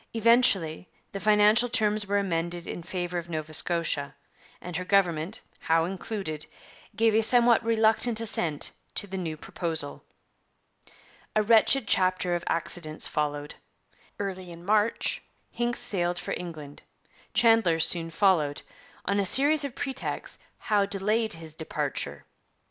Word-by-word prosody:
Eventually 215 Hz, -8 st, +2 dB, 0.2 s
the 195 Hz, -, -5 dB
financial 215 Hz, +3 st, +4 dB
terms 210 Hz, -2 st, +1 dB
were 205 Hz, +1 st, +1 dB
amended 175 Hz, -3 st, -2 dB
in -, -, -6 dB
favour 175 Hz, 0 st, -4 dB
of 170 Hz, 0 st, -10 dB
Nova 155 Hz, -1 st, -5 dB
Scotia, 160 Hz, -3 st, 0 dB, 0.4 s
and 180 Hz, -1 st, -8 dB
her 180 Hz, -, -2 dB
government, 180 Hz, -1 st, 0 dB, 0.2 s
Howe 165 Hz, 0 st, +1 dB
included, 180 Hz, -4 st, -5 dB, 0.5 s
gave 225 Hz, -1 st, +3 dB
a 220 Hz, -, +4 dB
somewhat 235 Hz, 0 st, +4 dB
reluctant 225 Hz, 0 st, +2 dB
assent 170 Hz, -9 st, +2 dB, 0.2 s
to -, -, +2 dB
the 195 Hz, -1 st, -8 dB
new 160 Hz, -3 st, -4 dB
proposal. 160 Hz, -2 st, -3 dB, 1.3 s
A 215 Hz, -, +3 dB
wretched 225 Hz, +2 st, +4 dB
chapter 185 Hz, -1 st, +2 dB
of 175 Hz, -1 st, -2 dB
accidents 165 Hz, -2 st, 0 dB
followed. 145 Hz, -1 st, -3 dB, 0.6 s
Early 190 Hz, -3 st, -5 dB
in 170 Hz, +1 st, -12 dB
March 210 Hz, +2 st, +1 dB, 0.3 s
Hincks 240 Hz, 0 st, -1 dB
sailed 180 Hz, -7 st, +1 dB
for -, -, -4 dB
England; 155 Hz, -5 st, -8 dB, 0.5 s
Chandler 225 Hz, -8 st, +4 dB
soon 165 Hz, 0 st, +1 dB
followed; 165 Hz, -5 st, +2 dB, 0.4 s
on 200 Hz, +2 st, 0 dB
a -, -, +2 dB
series 285 Hz, +9 st, +4 dB
of 280 Hz, -3 st, -5 dB
pretexts 265 Hz, -1 st, -4 dB, 0.2 s
Howe 205 Hz, -2 st, +1 dB
delayed 215 Hz, +3 st, +1 dB
his 160 Hz, -1 st, -8 dB
departure. 160 Hz, 0 st, -4 dB
185 Hz, 130 wpm, -27 LUFS, 165-220 Hz, 1.3 s, financial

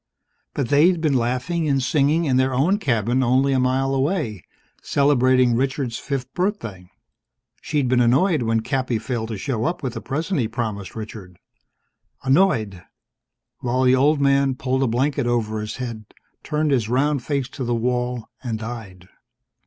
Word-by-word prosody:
But 135 Hz, -, -1 dB
they'd 165 Hz, +5 st, +4 dB
been 155 Hz, -3 st, +1 dB
laughing 130 Hz, +7 st, 0 dB
and 135 Hz, -1 st, +2 dB
singing 150 Hz, +5 st, +2 dB
in 130 Hz, -4 st, +2 dB
their 130 Hz, 0 st, +1 dB
own 175 Hz, +11 st, +2 dB
cabin 120 Hz, -, +1 dB
only 130 Hz, +2 st, +2 dB
a 130 Hz, -, +2 dB
mile 130 Hz, +1 st, +1 dB
away, 135 Hz, -, -1 dB, 0.4 s
celebrating 130 Hz, -3 st, +3 dB
Richard's 130 Hz, -1 st, -1 dB
fifth 135 Hz, -2 st, -4 dB
birthday. 115 Hz, -, -3 dB, 0.7 s
She'd 145 Hz, -3 st, -1 dB
been 125 Hz, 0 st, +2 dB
annoyed 140 Hz, +7 st, +3 dB
when 115 Hz, -1 st, +1 dB
Cappy 130 Hz, -1 st, -1 dB
failed 115 Hz, 0 st, -3 dB
to 110 Hz, -2 st, -5 dB
show 115 Hz, +1 st, -2 dB
up 170 Hz, -2 st, -2 dB
with 125 Hz, -3 st, -2 dB
the -, -, -6 dB
present 155 Hz, +5 st, -2 dB
he'd 115 Hz, -, +1 dB
promised 110 Hz, -4 st, -4 dB
Richard. 105 Hz, -5 st, -8 dB, 0.9 s
Annoyed 130 Hz, -, +2 dB, 0.8 s
while 125 Hz, +1 st, 0 dB
the 130 Hz, 0 st, +5 dB
old 145 Hz, +3 st, +3 dB
man 140 Hz, -1 st, +3 dB
pulled 130 Hz, 0 st, -1 dB
a 135 Hz, -, +2 dB
blanket 135 Hz, +3 st, 0 dB
over 110 Hz, -3 st, -1 dB
his 105 Hz, -, -5 dB
head, 115 Hz, -4 st, -6 dB, 0.4 s
turned 150 Hz, 0 st, -1 dB
his 120 Hz, -5 st, +1 dB
round 135 Hz, +2 st, +1 dB
face 140 Hz, -2 st, -1 dB
to 135 Hz, -, -6 dB
the 120 Hz, -1 st, 0 dB
wall, 125 Hz, 0 st, -1 dB
and 115 Hz, -4 st, -3 dB
died. 110 Hz, -6 st, -8 dB
130 Hz, 160 wpm, -22 LUFS, 115-140 Hz, 0.9 s, the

